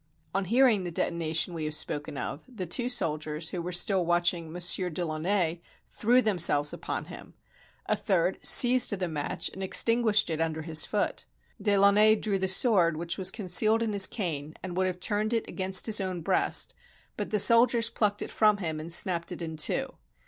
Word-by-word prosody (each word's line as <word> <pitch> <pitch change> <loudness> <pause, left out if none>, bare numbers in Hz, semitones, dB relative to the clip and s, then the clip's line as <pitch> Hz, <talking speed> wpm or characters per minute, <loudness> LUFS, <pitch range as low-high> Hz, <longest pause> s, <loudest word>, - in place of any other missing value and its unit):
On 195 +1 -1
hearing 235 -2 +2
the 175 - -5
detonation 165 0 0
we 160 -2 -5
have 155 0 -1
spoken 150 -1 -3
of, 135 +3 -6
the 205 -7 -6
two 240 +9 -2
soldiers 155 -8 -2
who 180 - -5
were 175 +1 -6
still 180 +1 +1
watching 175 -1 -1
Monsieur 180 +1 +1
de 175 +1 -4
Launay 170 +1 -1 0.3
threw 245 +3 +2
themselves 160 -8 +2
upon - - -5
him: - - -12 0.5
a - - 0
third 185 -3 -1
seized 250 0 +5
the 180 - -2
match 150 -3 -3
and 190 - -9
extinguished 215 0 +2
it 160 0 -3
under 160 -1 -3
his 160 -1 +1
foot. 210 - -3 0.4
De 200 -1 +1
Launay 205 +2 +4
drew 210 -2 -2
the 190 - -1
sword 185 -5 +3
which 170 +2 -5
was 185 -1 +2
concealed 215 +3 +2
in 220 -2 -3
his 195 -2 +5
cane, 155 -7 -5
and 180 -2 -6
would 185 0 0
have 180 -1 -5
turned 215 +3 -1
it 225 - -3
against 190 0 +1
his 215 -3 +1
own 185 -2 -4
breast, - - 0 0.4
but - - -5
the 215 - 0
soldiers 230 +2 +4
plucked 205 -2 -1
it - - -9
from 215 -2 +2
him 160 -5 -4
and 160 +2 -7
snapped 170 0 0
it 180 - -7
in 160 -1 -6
two. 155 - -1
185 Hz, 190 wpm, -27 LUFS, 165-210 Hz, 0.5 s, seized